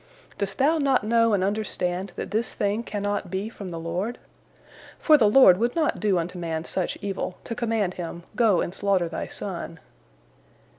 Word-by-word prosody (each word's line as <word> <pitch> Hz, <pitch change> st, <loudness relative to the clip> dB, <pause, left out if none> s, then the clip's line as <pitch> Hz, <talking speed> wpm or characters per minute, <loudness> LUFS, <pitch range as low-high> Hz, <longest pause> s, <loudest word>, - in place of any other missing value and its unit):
Dost 195 Hz, -1 st, -2 dB
thou 310 Hz, +4 st, +3 dB
not 270 Hz, -5 st, +2 dB
know 230 Hz, +1 st, +3 dB
and 190 Hz, -2 st, +2 dB
understand 190 Hz, -2 st, -2 dB
that -, -, -5 dB
this 220 Hz, +2 st, -1 dB
thing 205 Hz, +2 st, 0 dB
cannot 205 Hz, -4 st, -3 dB
be 195 Hz, +4 st, -3 dB
from 200 Hz, -4 st, -8 dB
the 170 Hz, -, -6 dB
Lord? 180 Hz, +8 st, -3 dB, 0.8 s
For 310 Hz, -, +5 dB
the 225 Hz, -8 st, +5 dB
Lord 210 Hz, -6 st, +7 dB
would 235 Hz, +2 st, 0 dB
not 320 Hz, -3 st, +1 dB
do 205 Hz, -4 st, +2 dB
unto 175 Hz, +2 st, -3 dB
man 165 Hz, -2 st, -3 dB
such 185 Hz, +1 st, -1 dB
evil, 195 Hz, -2 st, -4 dB
to -, -, -5 dB
command 225 Hz, -5 st, -1 dB
him, 170 Hz, -1 st, -6 dB
Go 215 Hz, -6 st, +3 dB
and 175 Hz, -, -3 dB
slaughter 195 Hz, -3 st, +1 dB
thy -, -, -5 dB
son." 170 Hz, -3 st, -6 dB
200 Hz, 180 wpm, -25 LUFS, 180-230 Hz, 0.8 s, Lord